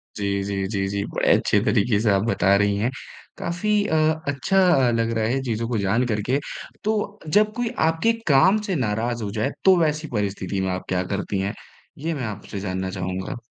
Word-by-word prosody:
जी, 100 -1 -1
जी, 100 -1 -2
जी, 95 -1 -1
जी, 100 0 -2
बड़े - - +2
अच्छे - - +2
तरीके 105 0 +2
से 110 - +2
आप 95 0 +3
बता 100 -4 +3
रही 100 0 +2
हैं। 110 +4 +1 0.5
काफ़ी 175 +5 -2 0.2
अ, 160 - 0 0.3
अच्छा 140 +7 +1 0.3
अ, - - +2
लग 115 0 0
रहा 110 - +1
है 130 +4 0
चीज़ों 115 -2 -2
को 120 - 0
जान 105 +5 +1
कर 105 -3 -1
के। 135 +2 +3 0.4
तो 210 -1 -1
जब 210 +7 +3
कोई 245 -1 -1 0.2
आपके 165 +8 +2
काम 155 +8 +5
से 200 -3 -2
नाराज़ 115 -2 -1
हो 100 - -3
जाए, 110 +1 -1 0.2
तो 190 -1 +7
वैसी 155 -1 0
परिस्थिति 100 -2 -2
में 95 - -1
आप 90 - -4
क्या 90 0 0
करती 100 0 -2
हैं? 100 +1 -2 0.4
ये 160 +4 -2
मैं 140 -5 -4
आपसे 105 -1 -6
जानना 95 -1 -3
चाहूँगा। 95 +1 -4
110 Hz, 205 wpm, -23 LUFS, 100-150 Hz, 0.5 s, तो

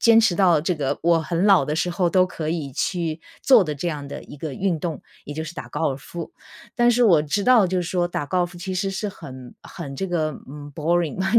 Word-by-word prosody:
坚 230 -1 +6
持 220 -5 +3
到 175 -5 +4
这 170 +4 0
个 145 -2 -2
我 170 0 +4
很 170 +3 -1
老 195 -8 +6
的 150 +2 -2
时 170 - 0
候 175 0 0
都 185 +1 +4
可 160 -4 -5
以 155 -4 -3
去 165 +2 -2 0.2
做 255 -6 +7
的 155 -4 -3
这 160 - -4
样 150 -3 -4
的 - - -6
一 - - -11
个 150 0 -5
运 180 +1 0
动， 160 -4 -3 0.2
也 145 - -6
就 160 +1 -3
是 160 +2 -8
打 - - -7
高 160 +1 -1
尔 135 - -4
夫。 170 - -8 0.4
但 240 -1 +4
是 240 +1 +3
我 170 -9 +5
知 175 +7 -1
道 250 -5 +6
就 185 0 0
是 170 - -4
说 175 -1 0
打 145 -4 -3
高 185 +4 0
尔 175 - +2
夫 175 0 -12
其 185 +2 -4
实 195 +2 -1
是 200 +2 -3
很 130 -9 -10
很 140 -5 -8
这 190 - -3
个， 160 -3 0 0.2
嗯， 145 +1 -9
boring 175 +6 +1
170 Hz, 300 characters per minute, -23 LUFS, 150-185 Hz, 0.4 s, 做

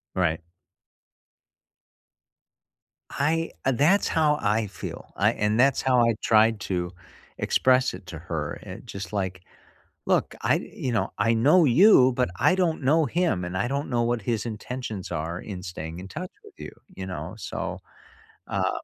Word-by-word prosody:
Right. 85 -2 0 2.7
I 165 +3 0
that's 145 +10 +3
how 150 -2 +2
I 105 +1 +1
feel, 95 - -8
I - - +3
and 105 +2 0
that's 135 +1 +4
how 125 -2 +3
I 115 -1 +3
tried 110 0 +4
to 90 -2 -2 0.5
express 130 0 +2
it - - -10
to 85 -3 -7
her, 80 -3 -4
eh, - - -8
just 100 +2 -7
like, 95 -3 -2 0.6
"Look, - - +1
I - - +3
you 130 - -4
know, 95 -4 0
I 115 +3 +2
know 150 +10 +5
you, 135 - +6
but 125 -3 0
I 185 - +4
don't 175 -4 0
know 155 +4 +3
him, 165 - 0
and 90 +1 -4
I 100 - 0
don't 140 +3 -2
know 120 -2 +1
what 120 -2 -1
his 115 0 -1
intentions 110 -2 -5
are 80 +3 -3
in 95 -3 -7
staying 85 -2 -6
in 95 - -8
touch 175 - -7
with 420 -2 -15
you, - - -7 0.2
you 95 - -6
know, 90 +2 -6
so, - - -5 0.7
uh" - - 0
115 Hz, 160 wpm, -25 LUFS, 95-140 Hz, 2.7 s, you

